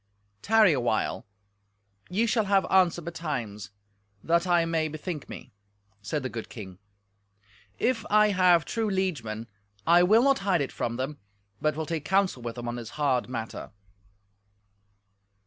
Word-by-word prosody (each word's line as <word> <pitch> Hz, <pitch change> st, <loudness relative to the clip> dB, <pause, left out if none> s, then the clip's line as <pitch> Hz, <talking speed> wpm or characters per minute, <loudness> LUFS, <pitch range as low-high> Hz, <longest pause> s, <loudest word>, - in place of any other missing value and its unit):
"Tarry 220 Hz, -5 st, +5 dB
a 135 Hz, -, 0 dB
while—ye 105 Hz, -, -4 dB
shall 225 Hz, -1 st, +1 dB
have 195 Hz, -1 st, +3 dB
answer 180 Hz, -3 st, +3 dB
betimes—that 105 Hz, -, -4 dB
I 175 Hz, -2 st, +3 dB
may 165 Hz, -1 st, 0 dB
bethink 155 Hz, 0 st, -6 dB
me," -, -, -9 dB, 0.5 s
said 135 Hz, +7 st, -3 dB
the -, -, -1 dB
good 115 Hz, -2 st, -7 dB
king. 95 Hz, -5 st, -10 dB, 1.0 s
"If 235 Hz, -3 st, 0 dB
I 210 Hz, 0 st, +5 dB
have 180 Hz, -4 st, +4 dB
true 225 Hz, -2 st, -1 dB
liegemen, 140 Hz, -, -2 dB, 0.4 s
I 170 Hz, +2 st, +6 dB
will 215 Hz, +7 st, +5 dB
not 275 Hz, 0 st, +3 dB
hide 195 Hz, -5 st, +1 dB
it 140 Hz, -, -2 dB
from 115 Hz, -, -3 dB
them, 135 Hz, +4 st, -4 dB, 0.4 s
but 155 Hz, -1 st, +1 dB
will 160 Hz, 0 st, -3 dB
take 160 Hz, -1 st, -3 dB
counsel 190 Hz, -5 st, +1 dB
with 115 Hz, -1 st, -5 dB
them 120 Hz, -1 st, -6 dB
on 120 Hz, 0 st, -3 dB
this 115 Hz, -2 st, -7 dB
hard 135 Hz, -5 st, +1 dB
matter." 115 Hz, -3 st, -5 dB
155 Hz, 145 wpm, -27 LUFS, 115-185 Hz, 1.0 s, I